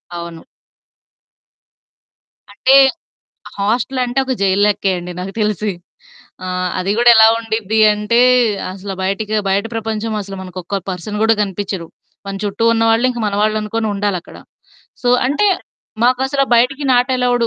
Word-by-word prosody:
అవును. 170 +1 -8 2.1
అంటే, 260 +6 +3 0.8
హాస్టల్ 240 +5 -1
అంటే 245 +2 -1
ఒక 260 - -1
జైల్ 195 0 +2
లెక్కే 200 -1 0
అండి 180 +1 -7
నాకు 190 +2 -6
తెలిసి. 210 -1 -1 0.7
ఆ! - - -5 0.3
అది 185 +2 -2
గూడా 240 0 +6
ఎలా 220 0 +8
ఉండిద్ది 220 -1 -1
అంటే, 210 +3 +1 0.5
అసలు 195 +1 -7
బయటికి 205 +3 -2
బయట 195 +2 +1
ప్రపంచం 220 0 -3
అసలు 195 0 -8
మనకొక్క 185 +1 -7 0.2
పర్సన్ 185 +4 -5
గూడా 225 0 +4
కనిపించరు. 195 -3 -4 0.4
మన 195 - -4
చుట్టూ 205 +2 -2
ఉన్నవాళ్ళు 225 +1 +2
ఇంక 240 - -6
మనవాళ్ళనుకోని 215 +2 -1
ఉండాలక్కడ. 200 -3 -3 0.7
సో, 245 - 0 0.2
అంటే, 290 +10 +1 0.6
మాకసల 265 +3 +2
బయటికి 265 +5 +2
నాట్ 245 +1 +2
అలోవ్‌డు. 245 -2 +1
215 Hz, 125 wpm, -17 LUFS, 195-235 Hz, 2.1 s, ఎలా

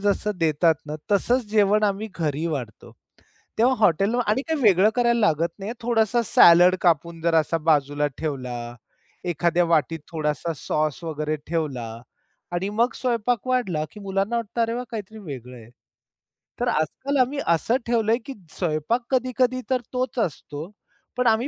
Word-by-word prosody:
जसं 205 +1 0
देतात 160 0 +3
ना 150 - -5 0.2
तसंच 240 +5 +2
जेवण 210 0 +3
आम्ही 205 +2 -1
घरी 155 0 -1
वाढतो. 125 -9 -5 0.7
तेव्हा 250 +4 +4
हॉटेल 195 +2 +3
आणि 215 +6 +1
काही 320 -3 -1
वेगळं 205 -2 +5
करायला 235 -1 +2
लागत 165 -5 +2
नाही. 200 +4 -4
थोडासा 235 0 +2
सलाद 175 0 +7
कापून 170 -1 +1
जर 165 -1 +2
असा 160 +1 +2
बाजूला 145 -1 +2
ठेवला, 125 -6 -4 0.5
एखाद्या 175 +1 +2
वाटीत 165 -1 +1
थोडासा 155 +1 -2
सॉस 155 +3 -2
वगैरे 155 -1 -2
ठेवला 130 -9 -3 0.5
आणि 175 +3 -2
मग 230 +4 +1
स्वयंपाक 245 -1 -1
वाढला 235 -12 0
की 210 - -12
मुलांना 195 +3 -1
वाटतं, 230 0 -2
अरे, 230 0 0
वा! 245 - -3
काहीतरी 220 -1 -6
वेगळं 130 - -8
आहे. 115 -1 -14 0.9
तर - - 0
आजकाल 260 - -1
आम्ही 270 +3 0
असं 170 +9 +2
ठेवलंय 230 -1 +2
की 275 - -6 0.2
स्वयंपाक 175 +8 0
कधी-कधी 255 0 +1
तर 255 -2 +1
तोच 255 0 -2
असतो. 155 -4 -4 0.5
पण 250 -1 +2
आम्ही 225 +3 +3
185 Hz, 150 wpm, -24 LUFS, 155-235 Hz, 0.9 s, सलाद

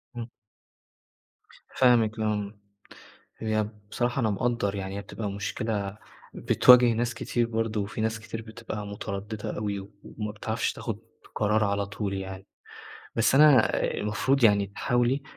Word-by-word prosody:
إمم. 120 0 -6 1.5
فاهمِك، 115 -3 +4
إمم. 105 -1 -2 0.8
هي 110 -1 -1 0.2
بصراحة 120 +2 0
أنا 110 - +2
مقدّر 105 -1 0
يعني 95 0 -4
هي - - -4
بتبقى 100 +1 -5
مشكلة 100 0 -3 0.4
بتواجه 125 -1 +6
ناس 115 +1 -1
كتير 115 +1 -1
برضه، 115 -2 -1
وفي 100 +2 -4
ناس 110 0 -1
كتير 110 +1 -7
بتبقى 110 -2 -7
مترددة 100 +1 -5
أوي 105 -1 -2
و 95 +1 -11
وما 105 -1 -5
بتعرفش 110 +1 -2
تاخد 110 -3 -5 0.4
قرار 105 +1 +2
على 100 0 0
طول 100 0 -4
يعني، 95 0 -6 0.7
بس 115 +3 +3
أنا 145 -5 +6
المفروض 120 +5 +1
يعني 100 -2 +5
تحاولي 120 +6 0
110 Hz, 135 wpm, -27 LUFS, 100-115 Hz, 1.5 s, بتواجه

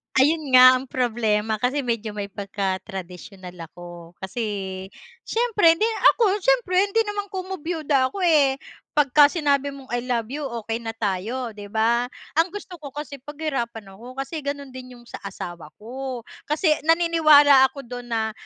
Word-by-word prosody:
Ayun 290 0 +3
nga 255 0 +8
ang 265 - -9
problema, 220 -4 0
kasi 260 +5 0
medyo 230 -3 -3
may 200 -1 -5
pagka-tradisyonal 190 -2 -6
ako. 175 0 -12
Kasi, 205 +5 -4 0.8
siyempre 435 -8 +3
'di 345 - -2 0.3
ako 420 -3 +2
siyempre 425 -5 +2
hindi 405 +3 +2
naman 415 -1 -4
komo 380 -1 -6
biyuda 300 -5 0
ako 380 +8 -5
eh, 295 -6 +4 0.4
'pagka 290 0 +6
sinabi 285 -3 0
mong 275 -2 -11
"i 245 - 0
love 240 -2 -1
you" 295 +2 -4 0.2
okey 225 +1 -3
na 225 -1 -6
tayo 225 +4 -3
'di 205 -1 -10
ba. 230 +3 +1 0.3
Ang 330 - +4
gusto 370 -2 -9
ko 285 - -7
kasi 295 -1 -7
paghirapan 255 -8 -5
ako, 245 +6 -12
kasi 275 +4 -4
ganun 280 -1 -5
din 255 -1 -10
yung 240 - -18
sa - - -9
asawa 175 -5 -8
ko. 255 +2 -6 0.3
Kasi 310 +2 +2 0.2
naniniwala 310 -5 +6
ako 275 +1 -10
dun 245 0 -8
na, 220 -1 -1
260 Hz, 160 wpm, -23 LUFS, 220-310 Hz, 0.8 s, nga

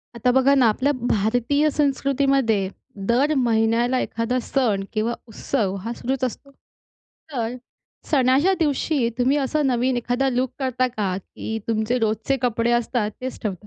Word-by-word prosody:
आता 245 +2 +2
बघा 265 +2 +4
ना 260 -3 +4
आपल्या 265 +7 +1 0.2
भारतीय 245 +9 +2
संस्कृतीमध्ये 275 -7 +1 0.4
दर 270 +6 +3
महिन्याला 235 +1 +2
एखादा 230 +2 -1
सण 230 -7 0
किंवा 225 +2 0
उत्सव 215 -2 -2
हा 235 - -2
सुरूच 260 +2 -3
असतो. 265 +3 -4 0.8
तर 240 -2 -2 0.5
सणाच्या 275 +4 +4
दिवशी 290 -4 +1
तुम्ही 255 +3 +3
असा 290 +2 0
नवीन 255 -1 +1
एखादा 245 +3 0
लूक 255 0 0
करता 255 -2 0
का, 205 -6 -2
की 220 +3 -6
तुमचे 225 +2 0
रोजचे 220 +4 0
कपडे 235 -1 +1
असतात 240 -2 0
तेच 260 0 -5
ठेवता? 205 -3 -4
245 Hz, 140 wpm, -23 LUFS, 225-270 Hz, 0.8 s, बघा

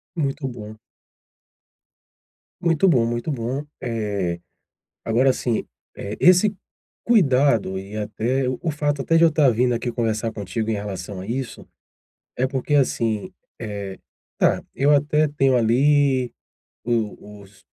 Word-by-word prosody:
Muito 140 -3 -2
bom. 110 -4 -8 1.9
Muito 170 +1 +3
bom, 125 -10 +4
muito 120 +6 -2
bom, 130 +2 -3 0.2
eh, 100 -7 -2 0.7
agora 120 +4 +3
assim, 120 -3 -1 0.3
eh, 100 +2 -6
esse 185 +4 +5 0.5
cuidado 135 - +3
e 100 +2 -9
até 115 +5 -1
o 130 0 -2
o 165 - -1
fato 145 -1 -1
até 165 +4 +2
de 165 - +5
eu 165 - +7
estar 150 -3 +4
vindo 125 +1 +2
aqui 120 +1 -2
conversar 115 -1 -1
contigo 110 +1 -4
em - - +1
relação 100 -2 -5
a - - -8
isso, 125 +2 -4 0.7
é 130 - +1
porque 135 +2 -2
assim, 115 -6 +1 0.3
eh, 100 -3 -6 0.4
tá, - - +2
eu 140 +2 +2
até 150 +1 +2
tenho, 135 -3 +2
ali, 130 +2 +3 0.5
o 105 -3 -3
os 100 0 -19
125 Hz, 135 wpm, -22 LUFS, 110-145 Hz, 1.9 s, eu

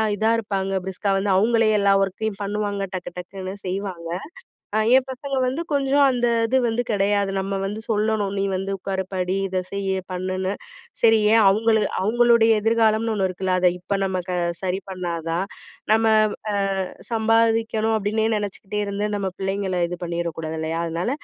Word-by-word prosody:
இதா 220 +2 +1
இருப்பாங்க. 195 -3 -2
பிரிஸ்கா 190 +2 -3
வந்து 195 +1 -1
அவுங்களே 225 +3 +3
எல்லா 200 -1 +3
ஒர்க்கையும் 195 +2 -2
பண்ணுவாங்க. 205 0 -2
டக்கு 180 -1 -5
டக்குன்னு 185 +1 -6
செய்வாங்க. 185 -3 -4 0.7
அ - - +3 0.2
ஏன் 260 -1 +4
பசங்க 270 +2 -4
வந்து 265 +6 -2
கொஞ்சம் 280 0 +3
அந்த 245 -1 +1 0.2
இது 260 - +2
வந்து 235 +1 0
கெடையாது. 200 -1 +1
நம்ம 195 +1 -2
வந்து 205 +3 -4
சொல்லணும், 210 -2 0
நீ - - +1
வந்து 195 +1 -2
உட்காரு 190 0 -3
படி. 185 0 -1
இத 185 0 -1
செய்யி, 195 -1 -1 0.2
பண்ணுன்னு. 185 +1 -2 0.5
சரி 225 -1 +6
ஏன் 225 -1 +6
அவங்களு 220 +2 +3 0.2
அவங்களுடைய 235 +2 +4
எதிர்காலம்னு 225 0 +2
ஒண்ணு 195 -2 +1
இருக்குல, 185 0 -1
அத 180 - +6
இப்ப 195 +3 -2
நம்ம 185 -1 -1
க - - -1 0.3
சரி 190 +1 -1
பண்ணா 180 -2 -3 0.2
தான். 175 +3 0 0.5
நம்ம 225 +1 +3 0.8
வ் - - 0
அ - - -13 0.2
சம்பாதிக்கணும் 225 0 +2
அப்படின்னே 215 +2 0
நினைச்சுக்கிட்டே 205 0 -4
இருந்து, 200 +1 -2
நம்ம 195 -2 -2
பிள்ளைங்கள 190 -1 -1
இது 175 0 -5
பண்ணிறக்கூடாது, 170 -2 -3
இல்லயா? 160 +1 -2
அதனால, 170 +6 -2
200 Hz, 160 wpm, -23 LUFS, 185-220 Hz, 0.8 s, சரி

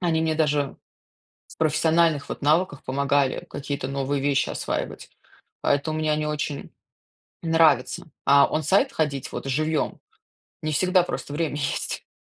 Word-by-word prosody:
они 165 -3 +1
мне 160 -1 +1
даже 150 -3 +1 0.7
с - - -15
профессиональных 160 -1 +2
вот - - -6
навыках 155 0 +2
помогали, 140 0 0
какие-то 140 -2 -4
новые 135 +1 -1
вещи 140 0 +1
осваивать. - - -4 0.5
Поэтому 155 +2 +1
мне 155 -1 +1
они 150 0 0
очень 150 -1 -3 0.7
нравятся, 160 -3 +2
а 140 0 +6
он-сайт 190 - +2
ходить 140 -4 -1
вот - - -5
живьем 155 +3 -1 0.6
не 155 - -1
всегда 180 +4 +3
просто 145 - -5
время 155 -2 -1
есть. 140 -1 -3
150 Hz, 135 wpm, -24 LUFS, 140-160 Hz, 0.7 s, а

